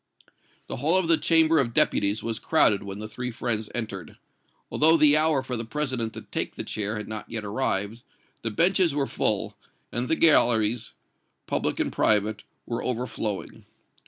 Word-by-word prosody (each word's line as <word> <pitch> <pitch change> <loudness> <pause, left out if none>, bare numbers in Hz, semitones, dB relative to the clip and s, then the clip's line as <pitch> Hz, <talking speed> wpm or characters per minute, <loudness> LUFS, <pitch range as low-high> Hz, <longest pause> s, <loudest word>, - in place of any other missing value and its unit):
The - - -6
hall 155 +8 +2
of 185 -3 +1
the 165 - +6
Chamber 160 0 +4
of 120 -4 -1
Deputies 100 +1 +2
was 115 -1 -3
crowded 110 -10 +3
when 100 -1 -7
the 110 +1 -6
three 125 +3 -5
friends 110 -2 -3
entered. 110 -6 -5 0.5
Although 160 +2 +5
the 150 -1 +6
hour 155 -3 +2
for 130 -1 -4
the 115 - -4
President 125 -2 -2
to - - -8
take - - -4
the - - -4
chair 105 0 -3
had 105 -1 -6
not 105 -1 -7
yet 110 -2 -4
arrived, 105 0 -2 0.4
the 115 - -3
benches 170 - +2
were 140 -2 +1
full, - - -1 0.4
and 120 +1 -3
the 160 - +2
galleries, 120 -8 +3 0.5
public - - -2
and - - -1
private, 105 0 +1 0.2
were 115 - -4
overflowing. 115 -4 -4
120 Hz, 170 wpm, -25 LUFS, 110-150 Hz, 0.5 s, the